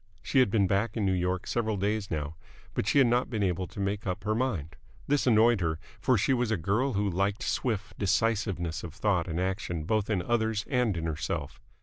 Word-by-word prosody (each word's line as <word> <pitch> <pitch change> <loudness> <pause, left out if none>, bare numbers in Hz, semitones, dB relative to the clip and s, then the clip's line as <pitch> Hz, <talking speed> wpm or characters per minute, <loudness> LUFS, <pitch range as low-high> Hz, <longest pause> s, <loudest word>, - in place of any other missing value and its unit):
She 135 - +2
had 125 - +5
been 100 -1 +3
back 100 +4 0
in 105 - +1
New 95 - +2
York 90 0 -1
several 110 -3 -1
days 105 +1 -1
now, 75 -1 -3 0.4
but - - -2
she 125 - +3
had 135 - +7
not 120 +1 +2
been 110 -4 -1
able 90 -1 0
to - - -11
make 100 +1 -2
up 90 -1 -3
her 105 +1 0
mind. 110 - -2 0.3
This 145 -1 +1
annoyed 115 -2 +5
her, 80 -2 0 0.2
for 125 +3 +3
she 120 +7 +2
was 125 -2 +1
a 110 - +1
girl 110 - 0
who 100 0 0
liked 100 +2 0
swift 110 -4 -2
decisiveness 100 -5 0
of 85 -2 -8
thought 95 -5 +1
and 85 0 -2
action 95 -3 -2
both 110 +5 0
in 95 -5 0
others 110 -1 0
and 125 -8 +1
in 80 - -3
herself. 80 -2 -3
100 Hz, 220 wpm, -29 LUFS, 90-115 Hz, 0.4 s, had